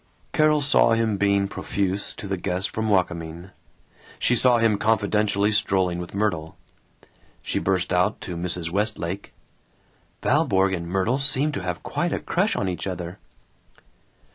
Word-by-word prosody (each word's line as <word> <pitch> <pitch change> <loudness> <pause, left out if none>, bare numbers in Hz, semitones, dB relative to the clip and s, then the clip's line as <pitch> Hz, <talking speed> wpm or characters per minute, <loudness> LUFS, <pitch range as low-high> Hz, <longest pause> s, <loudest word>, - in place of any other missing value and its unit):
Carol 155 -2 +3
saw 135 -4 +4
him 115 -2 +1
being 100 0 +2
profuse 100 0 -2
to 100 - -7
the 95 - -1
guest 95 +2 -2
from 110 0 -2
Wakamin. 90 -2 -1 0.7
She - - +2
saw 125 0 +5
him 115 -3 +2
confidentially 105 -1 +1
strolling 95 -4 +1
with 90 +2 -7
Myrtle. 95 -7 -1 0.9
She - - -1
burst 95 -1 0
out 90 0 +1
to 90 - -6
Mrs. 85 -1 -3
Westlake, 100 -2 -2 0.9
"Valborg 95 0 +2
and 85 -2 -3
Myrtle 95 +9 0
seem 145 +1 +2
to 130 - -4
have 90 -1 -4
quite - - -2
a - - -1
crush - - 0
on - - -1
each 90 +1 -3
other." 90 -1 -5
100 Hz, 145 wpm, -24 LUFS, 90-110 Hz, 0.9 s, saw